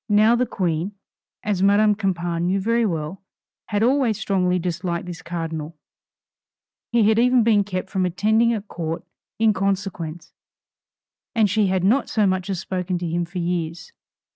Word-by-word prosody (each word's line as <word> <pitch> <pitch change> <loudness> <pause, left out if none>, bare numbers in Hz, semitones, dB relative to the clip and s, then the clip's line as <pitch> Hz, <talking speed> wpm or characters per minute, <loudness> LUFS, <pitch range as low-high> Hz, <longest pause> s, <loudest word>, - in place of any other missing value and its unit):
Now 215 +3 +5
the 250 +1 +1
Queen, 175 0 -1 0.5
as 205 -3 -1
Madame 205 +2 +5
Campan 175 -4 -1
knew 190 +2 +1
very 230 +3 +1
well, 165 +1 -4 0.5
had 205 0 0
always 245 -3 +2
strongly 185 -4 +1
disliked 175 0 -3
this 175 -2 -7
Cardinal; 165 -2 -5 1.1
he 235 -3 +4
had 220 +1 +4
even 250 0 +4
been 215 -3 +4
kept 190 -2 -4
from 190 -1 0
attending 220 +6 +2
at 215 -2 -3
Court 165 -1 -4 0.3
in 220 -1 +4
consequence, 190 -4 -3 1.0
and 220 -2 +4
she 205 +1 +2
had 185 -1 0
not 235 +9 +2
so 215 -2 +2
much 185 0 0
as 190 -3 -1
spoken 180 -1 -2
to 175 - -4
him 170 +1 -1
for 175 +3 -9
years. 170 -1 -3
190 Hz, 160 wpm, -22 LUFS, 175-215 Hz, 1.1 s, Now